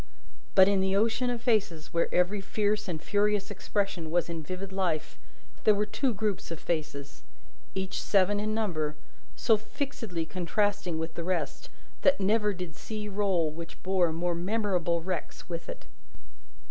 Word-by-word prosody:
But, 190 -1 +9
in 200 -1 +3
the 190 0 +2
ocean 225 +4 +2
of 240 -1 -2
faces 195 -10 +1
where 170 - +1
every 185 +3 +2
fierce 210 +1 0
and 170 -4 -2
furious 205 +3 +1
expression 195 -4 -1
was 170 +1 +1
in 165 -1 -3
vivid 185 +5 -5
life, 175 -5 -1 0.5
there 215 - +6
were 210 +1 +1
two 255 +5 0
groups 210 -2 -2
of 165 -2 -5
faces 150 -4 -3 0.5
each 190 0 -2
seven 205 +1 +3
in 215 +1 -1
number 155 -9 -1 0.4
so 225 - +4
fixedly 220 - -4
contrasting 185 0 0
with 160 0 -3
the 170 - -4
rest, 170 -4 -2 0.3
that 280 - +4
never 210 +2 +3
did 180 -4 -6
sea 210 +2 -5
roll 190 -6 +1
which 165 +2 -9
bore 185 -3 +3
more 175 +2 0
memorable 180 -2 0
wrecks 180 -3 -4
with 170 -1 -5
it. - - -7
190 Hz, 160 wpm, -29 LUFS, 170-210 Hz, 0.5 s, But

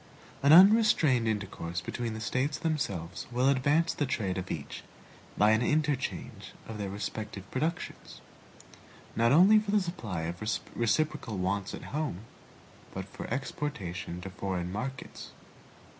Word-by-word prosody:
An 140 - +5
unrestrained 180 - +6
intercourse 95 -5 -3
between 115 +5 -4
the - - -5
States 130 +6 -1
themselves 100 - -3
will 125 +2 +3
advance 145 +5 +2
the 145 - -1
trade 95 -7 -1
of 95 - -6
each 75 -4 -5 0.5
by 105 +1 +5
an 110 +1 +3
interchange 150 0 -1
of 110 -1 -7
their 100 -1 -3
respective 100 0 -5
productions, 160 +6 -3 1.0
not 115 +1 +3
only 190 +9 +7
for 210 -1 -6
the 210 +1 +4
supply 160 - -4
of 85 +3 -5 0.3
reciprocal 115 -2 0
wants 95 +1 -1
at - - -10
home, 150 - -2 0.7
but 95 0 -4
for - - -7
exportation 95 - -4
to 95 +1 -7
foreign 90 -2 -3
markets. 125 +6 -6
115 Hz, 135 wpm, -30 LUFS, 95-150 Hz, 1.0 s, only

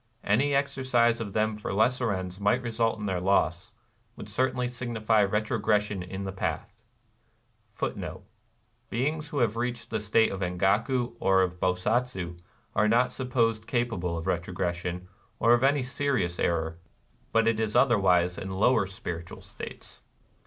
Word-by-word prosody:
Any 135 +8 +2
exercise 130 -4 +2
of 100 -3 -5
them 110 0 +1
for 105 - -5
lesser 115 +3 +2
ends 95 -1 -4
might 105 +5 +2
result 115 -1 0
in 105 - -5
their 95 -3 -1
loss, 95 +2 +1 0.2
— 115 0 -40
would - - -9
certainly 125 +3 0
signify 115 -3 +1
retrogression 105 -1 0
in 95 +2 -6
the 95 - -4
path.^ 100 +2 -4 1.1
^ - - -7 0.7
Beings 150 +6 -1
who 145 - -5
have 115 -4 +2
reached 120 0 -3
the 110 - 0
state 105 +2 +3
of 95 - -4
Engaku 105 +7 +1
or 95 -1 +4
of 90 -1 -3
Bosatsu 95 -1 -1 0.4
are 110 0 +3
not 120 +3 +3
supposed 115 -4 0
capable 115 -9 -1
of 80 - -5
retrogression, 90 0 -2 0.3
or 115 +1 +4
of 120 - +3
any 140 0 +3
serious 125 -9 -1
error; 80 -1 0 0.5
but 115 0 +3
it 115 -1 +2
is 110 0 -1
otherwise 95 -8 +3
in 95 - -5
lower 100 +2 +2
spiritual 85 -3 -7
states. - - -10
110 Hz, 150 wpm, -28 LUFS, 95-120 Hz, 1.1 s, or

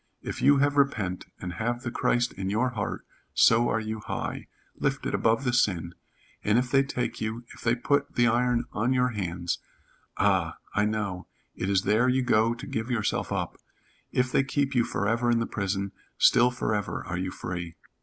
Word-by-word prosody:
If - - -5
you 140 +1 +6
have 145 +1 +2
repent, 105 -10 +1
and 90 -1 -5
have 120 +2 -1
the 120 - -3
Christ 120 0 +1
in 95 0 -4
your 115 +5 +1
heart, 110 -5 -4 0.3
so 115 +1 +5
are 115 - +1
you 110 0 -4
high - - -4 0.3
lifted - - -2
above 115 +3 +2
the 125 -2 0
sin, 90 -8 +1 0.5
and 105 +2 +3
if 125 0 0
they 135 - +5
take 135 -2 -3
you 110 +2 -3
if - - -14
they 120 0 +2
put 145 +4 0
the 120 - +4
iron 120 +1 +2
on 120 +5 +1
your 125 0 +2
hands 90 -5 -3 0.6
Ah, - - +2 0.2
I 105 - +2
know, 100 -4 -2 0.3
it 95 - -3
is 95 -1 +2
there 110 +5 +3
you 130 +1 +2
go 115 -1 +3
to 120 +4 -8
give 110 -3 -3
yourself 115 -5 -1
up, - - -2 0.5
if 125 0 +1
they - - +3
keep 140 +1 0
you 120 -3 +3
forever 115 +4 0
in 120 - +4
the 115 - 0
prison, 100 -2 -2 0.3
still 120 +1 +6
forever 110 -5 -2
are 90 0 -3
you 95 0 -2
free. 85 -2 -5
115 Hz, 190 wpm, -27 LUFS, 100-125 Hz, 0.6 s, you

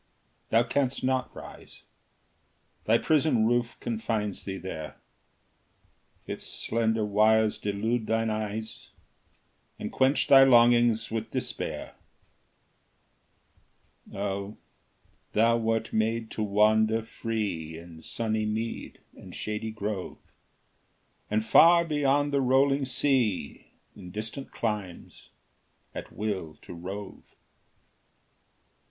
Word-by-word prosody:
Thou 115 +1 +4
canst 135 +1 -1
not 130 0 0
rise: - - -12 1.0
Thy 115 +2 +4
prison 150 -6 +2
roof 120 0 0
confines 110 -3 -3
thee 95 -1 -4
there; 80 -6 -7 1.3
Its - - -6
slender 110 -1 -1
wires 110 +1 +3
delude 110 +3 -1
thine 115 0 +1
eyes, 110 +1 -5 0.9
And - - -5
quench 130 +2 +2
thy 135 -1 +8
longings 120 -3 +5
with 110 0 -3
despair. - - -4 2.2
Oh, 100 +1 -4 0.8
thou 115 +2 +4
wert 115 0 -1
made 110 +1 0
to - - -4
wander 110 +2 +3
free 105 -9 -4
In 85 -1 -12
sunny 110 +2 -2
mead 110 +2 -4
and - - -12
shady 105 +1 -4
grove, 105 -3 -4 1.1
And 110 +1 0
far 170 +8 +6
beyond 145 -2 +1
the 140 - +3
rolling 135 +2 +3
sea, 125 - 0 0.3
In 90 - -10
distant 110 +7 -6
climes, 105 -6 -5 0.6
at - - -7
will 95 -7 -4
to - - -9
rove! 95 +4 -7
110 Hz, 100 wpm, -28 LUFS, 105-120 Hz, 2.2 s, thy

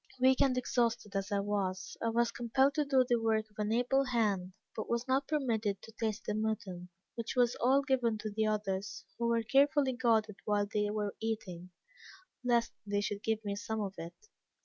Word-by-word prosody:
"Weak 260 0 +4
and 255 -2 +3
exhausted 230 -5 0
as 195 0 -2
I 200 -1 +1
was, 195 -2 -2
I 230 - +1
was 235 +1 +2
compelled 265 +4 +2
to 300 -2 +1
do 265 -2 +4
the 240 -2 +2
work 220 -1 +1
of 210 - -18
an 210 0 0
able 250 +4 +2
hand, 205 -7 0 0.2
but 220 - -5
was 235 +2 -1
not 270 +1 +1
permitted 225 -9 0
to 225 - -13
taste 220 0 -3
the 210 - -1
mutton, 205 -5 -3 0.2
which 230 +1 -5
was 245 -1 +3
all 265 +3 +4
given 250 -5 +1
to 215 0 -5
the 215 +1 0
others, 205 -2 -2
who 235 - +1
were 230 -1 +2
carefully 275 +3 +3
guarded 225 -4 +1
whilst 205 0 0
they 210 -1 +1
were 210 -1 -2
eating, 190 -6 -4 0.7
lest 235 -2 +2
they 205 0 -1
should 205 0 -3
give 220 -1 -1
me 200 0 -2
some 220 +1 -3
of 200 -2 -3
it." 165 +1 -7
220 Hz, 195 wpm, -32 LUFS, 205-245 Hz, 0.7 s, Weak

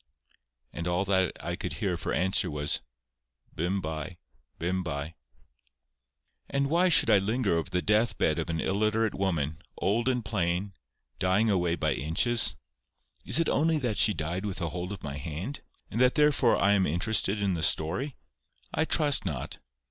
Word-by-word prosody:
And 85 - -4
all 90 +2 0
that 95 -2 +2
I - - -2
could - - -4
hear - - -1
of - - -5
her - - -2
answer 95 +2 +1
was, 75 -1 0 0.7
"Bym 90 +5 -1
by; 80 +2 -5 0.4
bym 90 +2 -1
by." 80 -2 -4 1.4
Why 150 +7 +2
should 135 -8 +5
I 105 - +6
linger 110 0 0
over 85 -1 -2
the 90 -1 -1
death 110 +4 +2
bed 80 +1 +1
of 80 - -3
an 80 -1 -1
illiterate 110 +4 +1
woman, 80 -6 -2 0.2
old 115 +6 +1
and 125 -3 -1
plain, 95 -2 -1 0.5
dying 95 +4 +2
away 90 -3 +1
by - - 0
inches? 110 - +2 0.7
Is - - +5
it 165 - +2
only 160 +2 +2
that 120 -7 -1
she 105 - +4
died 85 +4 -3
with 100 -3 -3
a 85 -2 -2
hold 90 +4 -5
of 100 - -7
my 70 -1 -5
hand, 80 - -5 0.3
and 115 - -1
that 125 0 +4
therefore 150 -5 +4
I 100 - +3
am 95 -2 +2
interested 100 +4 +1
in 100 -2 +1
the 85 - -3
story? 90 - 0 0.6
I 160 - +1
trust 150 -3 +3
not. 75 -9 -5
95 Hz, 170 wpm, -28 LUFS, 85-115 Hz, 1.4 s, I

